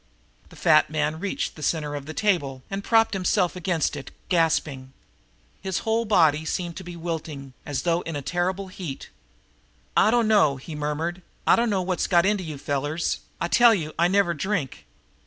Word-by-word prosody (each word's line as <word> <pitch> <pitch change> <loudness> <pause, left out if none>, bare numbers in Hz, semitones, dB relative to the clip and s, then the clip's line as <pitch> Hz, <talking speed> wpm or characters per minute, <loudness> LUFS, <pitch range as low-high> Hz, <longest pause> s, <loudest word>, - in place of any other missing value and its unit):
The - - -15
fat 155 -1 +4
man 155 0 -1
reached 200 +2 -2
the 155 - -11
center 150 -2 -1
table 150 -4 -1
and 195 +1 -3
propped 225 0 +3
himself 185 -1 +1
against 175 -4 -1
it, 140 - -7 0.2
gasping. 150 -6 0 0.7
His 190 -2 -2
whole 225 +1 +1
big - - -11
body 160 -6 +4
seemed 170 +1 -3
to 190 - -7
be 175 0 -8
wilting, 160 -5 -5
as 140 -3 -2
though 170 0 +1
in 165 -3 -5
a 145 - -4
terrific 185 +4 -2
heat. 175 -8 -7 0.9
"I - - +5
dunno!" 215 -10 +4
he 135 +5 -9
murmured. 150 +4 -3 0.2
"I - - +6
dunno 215 -5 +1
what's 185 0 -1
got 175 -1 +4
into 205 -1 +1
you 155 -4 -6
fellers. 145 +3 -2 0.2
I 170 - 0
tell 235 +4 +6
you, 155 -5 -4
I 170 - +5
never 190 -2 +2
drink." 165 - -3
170 Hz, 175 wpm, -25 LUFS, 150-190 Hz, 0.9 s, I